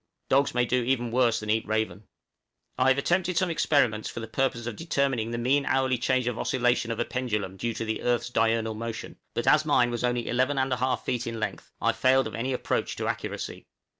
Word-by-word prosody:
Dogs 140 Hz, 0 st, +3 dB
may 125 Hz, 0 st, +3 dB
do 125 Hz, +1 st, +1 dB
even 120 Hz, -1 st, 0 dB
worse 120 Hz, -2 st, +3 dB
than 105 Hz, 0 st, -2 dB
eat 110 Hz, 0 st, 0 dB
raven. 110 Hz, -2 st, -2 dB, 0.7 s
I 130 Hz, -, +2 dB
have 130 Hz, 0 st, +4 dB
attempted 175 Hz, +4 st, +1 dB
some 185 Hz, 0 st, +2 dB
experiments 125 Hz, -9 st, +2 dB
for -, -, -6 dB
the 115 Hz, -, -6 dB
purpose 120 Hz, 0 st, -1 dB
of 120 Hz, -2 st, -4 dB
determining 140 Hz, -7 st, 0 dB
the 115 Hz, -, -3 dB
mean 130 Hz, +4 st, +2 dB
hourly 130 Hz, -2 st, +1 dB
change 130 Hz, 0 st, +1 dB
of 120 Hz, -1 st, -2 dB
oscillation 125 Hz, -2 st, +1 dB
of 115 Hz, 0 st, -3 dB
a 120 Hz, -, +1 dB
pendulum 105 Hz, -7 st, -2 dB
due 115 Hz, +3 st, -3 dB
to 115 Hz, -, -3 dB
the 110 Hz, 0 st, -2 dB
earth's 120 Hz, 0 st, 0 dB
diurnal 115 Hz, -1 st, +1 dB
motion; 115 Hz, +1 st, -6 dB, 0.2 s
but -, -, -1 dB
as 155 Hz, -, +5 dB
mine 125 Hz, -5 st, +3 dB
was 120 Hz, 0 st, -3 dB
only 120 Hz, -1 st, 0 dB
11 130 Hz, +4 st, +1 dB
1/2 130 Hz, -1 st, 0 dB
feet 120 Hz, -1 st, -2 dB
in 115 Hz, -1 st, -4 dB
length, 110 Hz, -, -4 dB
I -, -, +2 dB
failed 130 Hz, +1 st, +3 dB
of 110 Hz, -, -5 dB
any 115 Hz, +5 st, -2 dB
approach 125 Hz, -, -1 dB
to -, -, -3 dB
accuracy. -, -, -4 dB
120 Hz, 215 wpm, -27 LUFS, 115-130 Hz, 0.7 s, as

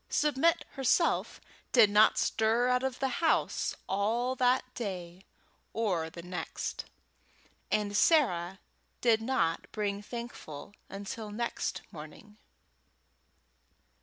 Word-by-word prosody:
Submit 300 Hz, +3 st, +2 dB
herself 275 Hz, +5 st, +1 dB, 0.3 s
did 225 Hz, -5 st, +6 dB
not 210 Hz, +1 st, +5 dB
stir 225 Hz, +3 st, +2 dB
out 250 Hz, 0 st, +2 dB
of 265 Hz, -1 st, -2 dB
the 270 Hz, -, 0 dB
house 325 Hz, -, +1 dB
all 225 Hz, +6 st, 0 dB
that 250 Hz, +1 st, +3 dB
day 185 Hz, -4 st, -6 dB, 0.5 s
or 185 Hz, -8 st, -1 dB
the 170 Hz, +1 st, -10 dB
next, 180 Hz, 0 st, -5 dB, 0.9 s
and 205 Hz, -1 st, 0 dB
Sarah 190 Hz, -, +3 dB, 0.4 s
did 225 Hz, -2 st, +3 dB
not 225 Hz, -9 st, -1 dB
bring 205 Hz, -1 st, -2 dB
Thankful 210 Hz, -8 st, -8 dB, 0.2 s
until 205 Hz, +2 st, -6 dB
next 235 Hz, +3 st, -3 dB
morning. 155 Hz, +7 st, -12 dB
215 Hz, 105 wpm, -30 LUFS, 190-250 Hz, 0.9 s, did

